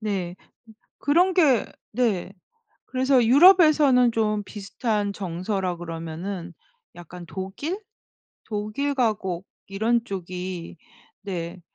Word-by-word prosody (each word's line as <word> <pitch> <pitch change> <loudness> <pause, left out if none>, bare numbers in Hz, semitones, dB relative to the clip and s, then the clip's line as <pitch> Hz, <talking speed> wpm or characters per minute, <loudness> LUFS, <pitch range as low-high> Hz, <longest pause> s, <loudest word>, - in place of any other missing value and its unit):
네. 190 -5 -3
음 - - -26 0.5
그런 355 +6 +3
게 285 - +4 0.3
네. 210 -6 0 0.6
그래서 260 -1 +2
유럽에서는 290 -4 +6
좀 215 -2 0
비슷한 205 0 -2
정서라 185 0 -3
그러면은 170 +2 -6 0.4
약간 175 +1 -10
독일? 195 - -5 0.7
독일 215 +7 -2
가곡 200 -7 -1 0.2
이런 225 +4 +1
쪽이 180 -3 -6 0.4
네. 180 -2 -5
205 Hz, 195 characters per minute, -24 LUFS, 180-250 Hz, 0.7 s, 유럽에서는